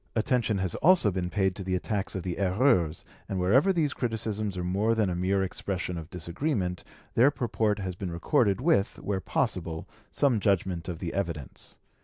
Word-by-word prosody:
Attention 115 -1 +1
has 95 -3 -1
also 175 - +4
been 90 -1 -2
paid 95 -1 +1
to 100 - -6
the 95 0 -1
attacks 100 +2 -2
of 95 - -3
the 90 0 -4
'Erreurs', 95 - +2 0.3
and 95 - -2
wherever 125 - +4
these 160 -6 +1
criticisms 110 -4 -2
are 90 - -2
more 100 +6 +1
than 105 -4 +1
a - - -2
mere 95 +2 +1
expression 95 -1 -3
of 80 -1 -7
disagreement, 90 - -2 0.3
their 125 +5 +6
purport 110 -6 0
has 95 -3 -4
been 95 0 -4
recorded 100 - +1
with, 130 - +2
where 100 -2 -2
possible, 80 -2 -2 0.2
some 130 -6 +2
judgment 95 -4 0
of 85 - -4
the 85 0 -4
evidence. 85 -8 -5
95 Hz, 180 wpm, -28 LUFS, 90-110 Hz, 0.3 s, their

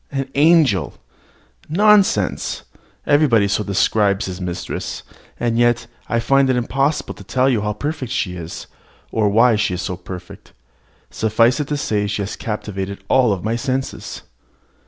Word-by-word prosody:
An 135 -1 -3
angel! 150 - +3 0.7
Nonsense! 195 - +2 0.4
Everybody 140 -8 +4
so 105 - 0
describes 100 0 +1
his 95 0 -6
mistress; 90 -1 -5 0.4
and 120 -1 0
yet 120 -1 +2 0.2
I 120 - +1
find 135 +3 +3
it 130 - +3
impossible 135 +5 0
to - - -13
tell 130 0 +1
you 120 -6 +2
how 105 0 -1
perfect 145 +1 -4
she 90 -7 -1
is, 85 -1 -7 0.5
or 110 -2 +2
why 115 +2 +4
she 100 -3 0
is 95 - -4
so 90 - -3
perfect: 90 0 -10 0.6
suffice 115 +4 +2
it 145 - -2
to 150 - -1
say 105 -7 -1
she 105 0 -2
has 100 - -5
captivated 100 -3 -5
all 120 -7 +3
my 110 +2 0
senses. 130 +3 -4
115 Hz, 150 wpm, -20 LUFS, 100-135 Hz, 0.7 s, Everybody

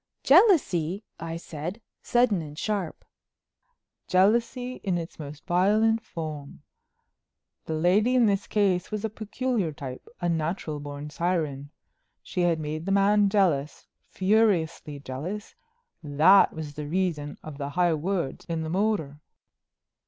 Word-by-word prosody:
"Jealousy!" 220 - +4 0.2
I 165 0 -5
said, 170 +5 -6 0.2
sudden 240 -7 +2
and 150 -1 -9
sharp. 200 -5 -3 1.0
"Jealousy 235 +6 +2
in 185 -3 0
its 165 -1 -7
most 145 -1 -9
violent 210 +5 +3
form. 155 -7 -7 1.0
The 160 - -3
lady 200 +10 +3
in 245 -2 +5
this 200 +1 +1
case 195 -4 +1
was 215 0 -3
a 220 - -3
peculiar 220 -3 -2
type—a 140 - -7
natural 160 -2 -2
born 145 +1 -7
siren. 155 -5 -2 0.5
She 180 - -3
had 170 -2 +2
made 155 +3 -4
the - - 0
man 200 +1 +4
jealous, 170 -8 +1 0.2
furiously 185 -7 +1
jealous. 155 - -6 0.5
That 155 +6 +5
was 155 -2 -7
the 150 0 -6
reason 160 -4 -2
of 155 -2 -9
the 140 0 -3
high 175 +2 +2
words 170 -2 -2
in 165 -2 -3
the 160 - -4
motor." 180 -7 0
175 Hz, 130 wpm, -26 LUFS, 155-205 Hz, 1.0 s, in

